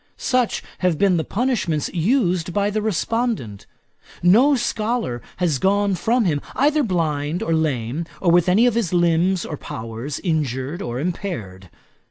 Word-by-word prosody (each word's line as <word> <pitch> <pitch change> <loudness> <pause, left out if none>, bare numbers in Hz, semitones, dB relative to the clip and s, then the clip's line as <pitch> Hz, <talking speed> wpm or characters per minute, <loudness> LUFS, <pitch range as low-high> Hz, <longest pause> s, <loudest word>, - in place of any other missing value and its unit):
Such 255 -3 0 0.2
have 180 -4 +1
been 190 -1 +3
the 160 - 0
punishments 200 - -1
used 180 - +1
by 205 0 +1
the 215 +1 -1
respondent. 215 - -2 0.6
No 240 +11 +5
scholar 230 - -2 0.2
has 165 -7 0
gone 200 +3 +2
from 230 +5 +1
him 150 -5 0
either 300 +3 +3
blind 165 - -1
or 165 - 0
lame, 150 -1 -1
or 175 - +2
with 175 +1 +4
any 210 +7 +4
of 245 - +3
his 215 -7 -1
limbs 175 +1 +2
or 150 - -5
powers 115 +5 -6
injured 150 -1 -2
or 120 -4 -4
impaired. 115 - -5
175 Hz, 150 wpm, -21 LUFS, 150-215 Hz, 0.6 s, No